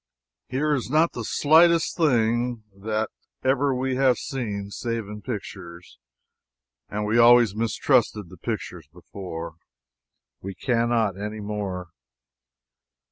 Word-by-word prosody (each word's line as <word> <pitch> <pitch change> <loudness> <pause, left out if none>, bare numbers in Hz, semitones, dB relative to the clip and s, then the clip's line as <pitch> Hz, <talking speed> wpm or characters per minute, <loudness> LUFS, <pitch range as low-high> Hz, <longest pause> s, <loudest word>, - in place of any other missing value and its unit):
Here 150 +4 0
is 130 -4 -2
not 155 +4 +3
the 120 - -5
slightest 165 +7 +4
thing 120 -5 +1
that 110 +2 -2 0.3
ever 135 +1 +2
we 130 0 -1
have 130 -2 +4
seen 105 -7 -4
save 115 -1 -3
in 105 0 -8
pictures 95 -7 -8 0.9
and 105 +1 -3
we 110 +3 +2
always 120 -3 +7
mistrusted 115 -3 +1
the 90 - -13
pictures 90 - -5
before. 85 -2 -8 0.8
We 95 0 -6
cannot 115 -4 +1
anymore. 105 -4 -4
110 Hz, 110 wpm, -24 LUFS, 100-125 Hz, 0.9 s, always